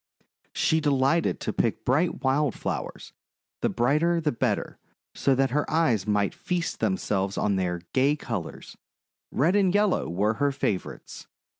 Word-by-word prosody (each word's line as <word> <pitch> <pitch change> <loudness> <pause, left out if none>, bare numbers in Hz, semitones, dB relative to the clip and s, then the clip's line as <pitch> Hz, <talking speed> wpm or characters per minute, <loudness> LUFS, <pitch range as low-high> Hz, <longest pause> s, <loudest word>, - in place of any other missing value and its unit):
She 160 - +2
delighted 145 +2 +1
to - - -2
pick - - -1
bright 155 +4 +1
wild 135 -1 +1
flowers - - -5 0.2
— - - -68
the - - +2
brighter 155 +8 +2
the 155 -2 0
better 120 - -2 0.2
— - - -68
so 135 - +2
that 135 -1 +1
her 150 +3 0
eyes 125 - +1
might 105 -1 +1
feast 175 -2 -3
themselves 100 - -1
on 100 -1 +1
their 90 -2 -1
gay 135 +3 +3
colours. 115 - -6 0.6
Red 170 +8 +2
and 195 -3 +3
yellow 205 - +1
were 100 +6 +1
her 145 0 +3
favourites. 110 -9 -4
135 Hz, 155 wpm, -26 LUFS, 105-160 Hz, 0.6 s, gay